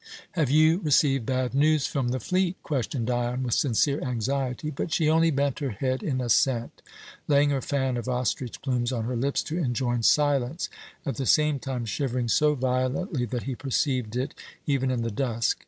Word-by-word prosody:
"Have 155 -7 0
you 155 +4 +4
received 140 - +2
bad 130 -1 0
news 150 +1 +3
from 135 -4 -1
the 130 +2 -1
fleet?" 185 - 0
questioned 130 -3 -2
Dion, 120 +1 -1
with 120 -2 -1
sincere 140 +3 +2
anxiety; 130 +3 -2
but 155 +3 -4
she 160 -1 +2
only 165 +1 +4
bent 140 -2 0
her 140 -2 -2
head 130 +4 -2
in 130 -4 -1
assent, 120 -1 +1 0.5
laying 145 0 +4
her 135 -2 0
fan 130 -1 -1
of 120 +2 -4
ostrich 125 0 -2
plumes 125 -2 0
on 120 -3 -2
her 125 +2 -2
lips 135 +4 0
to 160 +3 -3
enjoin 120 -4 0
silence, 145 +3 +2 0.4
at 140 - -3
the 135 -3 -2
same 150 -2 +3
time 130 -3 -4
shivering 120 +1 -2
so 150 +5 +3
violently 130 +3 -1
that 120 0 -4
he 135 - -3
perceived 125 -3 -1
it, 130 +2 -2 0.3
even 135 -2 +1
in 125 -2 -1
the 115 - -2
dusk. 115 0 0
130 Hz, 185 wpm, -26 LUFS, 125-145 Hz, 0.5 s, you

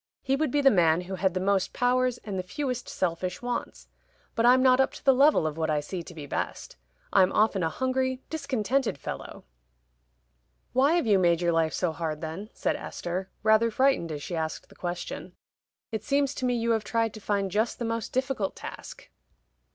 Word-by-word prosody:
He 270 0 +1
would 305 +1 0
be 290 +3 +1
the 270 -1 +6
man 170 -3 +4
who 180 +2 -7
had 190 -1 0
the - - +1
most 190 0 +1
powers 250 0 +2
and 200 -3 -4
the - - +1
fewest 250 +6 -4
selfish 180 +3 -2
wants. 245 0 -4 0.5
But 230 +1 +2
I'm 255 +1 +6
not 255 0 +5
up 265 - +3
to - - -12
the 270 - +7
level 275 - +4
of 155 0 -2
what 160 -1 -1
I 150 -1 +2
see 170 +5 -5
to 170 +1 -11
be 150 -2 -7
best. 140 - -4 0.4
I'm 190 -1 +5
often 210 -3 +2
a 165 - +1
hungry 260 +6 -1
discontented 270 - -1
fellow." - - -7 1.3
"Why 275 +5 +4
have 345 -5 +2
you 205 -3 +4
made 170 -2 +3
your 175 -1 +1
life 165 -1 +1
so 180 -3 0
hard 155 -1 -3
then?" 165 +7 -6
said - - 0
Esther, 185 +2 -5
rather 220 +1 +4
frightened 260 -8 +2
as 145 -2 -5
she 175 - -4
asked 160 -1 -4
the - - -17
question. 175 0 -5 0.6
"It 220 -2 -3
seems 280 +2 +1
to 260 - -3
me 245 -1 +1
you 235 0 0
have 220 -2 +1
tried 225 0 0
to 215 - -10
find 200 -2 -1
just 220 +4 0
the 240 - -3
most 230 -1 -3
difficult 260 -6 -1
task." - - -9
215 Hz, 205 wpm, -27 LUFS, 175-255 Hz, 1.3 s, the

